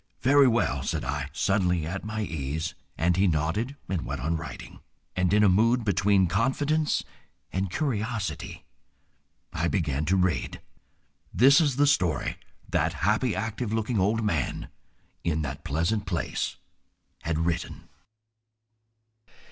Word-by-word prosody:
"Very 140 Hz, +1 st, +6 dB
well," 120 Hz, -1 st, +1 dB
said -, -, -2 dB
I, 70 Hz, +1 st, -3 dB
suddenly 90 Hz, -1 st, +1 dB
at 95 Hz, +5 st, -4 dB
my 110 Hz, 0 st, -3 dB
ease, 80 Hz, 0 st, -3 dB, 0.2 s
and 85 Hz, +2 st, +2 dB
he 95 Hz, +2 st, +3 dB
nodded 85 Hz, -, 0 dB
and 90 Hz, -4 st, -2 dB
went -, -, -4 dB
on 80 Hz, +6 st, -1 dB
writing. 80 Hz, -4 st, -7 dB, 0.4 s
And 95 Hz, -1 st, +1 dB
in 105 Hz, +1 st, +4 dB
a -, -, +6 dB
mood 115 Hz, +6 st, +3 dB
between 100 Hz, -1 st, +3 dB
confidence 140 Hz, -, +1 dB, 0.5 s
and 95 Hz, 0 st, -1 dB
curiosity, 110 Hz, -, -3 dB, 0.9 s
I 85 Hz, -, 0 dB
began 75 Hz, -6 st, 0 dB
to 90 Hz, +5 st, +2 dB
read. 90 Hz, -4 st, 0 dB, 0.7 s
This 135 Hz, -, +6 dB
is 145 Hz, -5 st, +1 dB
the 145 Hz, +2 st, +4 dB
story 95 Hz, -, +1 dB, 0.3 s
that -, -, 0 dB
happy, 110 Hz, +1 st, +2 dB
active 110 Hz, +2 st, -3 dB
looking 110 Hz, 0 st, 0 dB
old 110 Hz, +4 st, +1 dB
man 80 Hz, -, -1 dB, 0.5 s
in 80 Hz, -2 st, 0 dB
that 70 Hz, -1 st, -5 dB
pleasant 85 Hz, +8 st, -1 dB
place 85 Hz, -5 st, -2 dB, 0.7 s
had 80 Hz, 0 st, -1 dB
written. 85 Hz, +1 st, -2 dB
95 Hz, 130 wpm, -27 LUFS, 80-110 Hz, 0.9 s, Very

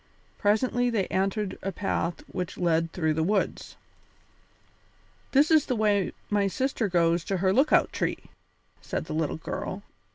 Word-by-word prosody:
Presently 245 Hz, +4 st, +2 dB
they 215 Hz, -5 st, 0 dB
entered 195 Hz, +1 st, -1 dB
a 195 Hz, -, -2 dB
path 190 Hz, -3 st, -2 dB
which 180 Hz, -2 st, -5 dB
led 165 Hz, -2 st, +1 dB
through 160 Hz, -3 st, 0 dB
the 160 Hz, -, -1 dB
woods. 195 Hz, +5 st, -1 dB, 1.6 s
"This 285 Hz, +4 st, +4 dB
is 310 Hz, -2 st, +5 dB
the 255 Hz, -, 0 dB
way 205 Hz, -3 st, +2 dB, 0.2 s
my 205 Hz, -1 st, +1 dB
sister 255 Hz, +1 st, -1 dB
goes 170 Hz, -2 st, +2 dB
to 195 Hz, -, -1 dB
her 190 Hz, +1 st, +2 dB
lookout 270 Hz, +7 st, +3 dB
tree," -, -, -1 dB, 0.6 s
said -, -, -4 dB
the -, -, -6 dB
little 155 Hz, -1 st, -1 dB
girl. 190 Hz, +4 st, -5 dB
195 Hz, 150 wpm, -27 LUFS, 175-220 Hz, 1.6 s, is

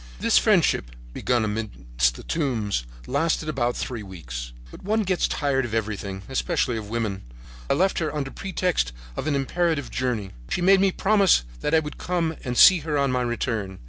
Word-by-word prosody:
"This -, -, +4 dB
friendship, -, -, +2 dB, 0.2 s
begun 120 Hz, -, +1 dB
amid 110 Hz, +1 st, -2 dB, 0.5 s
the -, -, -10 dB
tombs, 115 Hz, -, -1 dB, 0.2 s
lasted 155 Hz, +3 st, 0 dB
about 120 Hz, -5 st, -1 dB
three 120 Hz, -3 st, -4 dB
weeks. 60 Hz, -12 st, -7 dB, 0.2 s
But -, -, -12 dB
one 215 Hz, +3 st, +1 dB
gets 185 Hz, -2 st, +1 dB
tired 140 Hz, -2 st, 0 dB
of 115 Hz, -2 st, -3 dB
everything, 100 Hz, -3 st, -3 dB
especially 135 Hz, -2 st, 0 dB
of 105 Hz, -2 st, -5 dB
women. 110 Hz, -4 st, -2 dB, 0.5 s
I -, -, +4 dB
left 190 Hz, +2 st, +2 dB
her 160 Hz, -3 st, -1 dB
under 140 Hz, -3 st, -3 dB
pretext 180 Hz, -, -1 dB, 0.2 s
of -, -, -4 dB
an 150 Hz, -, +1 dB
imperative 155 Hz, +1 st, 0 dB
journey. 115 Hz, -7 st, -2 dB, 0.2 s
She -, -, -1 dB
made 190 Hz, +2 st, +5 dB
me 195 Hz, -1 st, +4 dB
promise 195 Hz, -, +3 dB, 0.2 s
that 110 Hz, -, +1 dB
I -, -, +6 dB
would 150 Hz, -1 st, -8 dB
come 170 Hz, -3 st, -1 dB
and 125 Hz, -2 st, -3 dB
see 185 Hz, -3 st, +8 dB
her 150 Hz, -1 st, -2 dB
on 140 Hz, -2 st, +2 dB
my 125 Hz, 0 st, +1 dB
return. 115 Hz, -5 st, -2 dB
130 Hz, 180 wpm, -24 LUFS, 110-165 Hz, 0.5 s, see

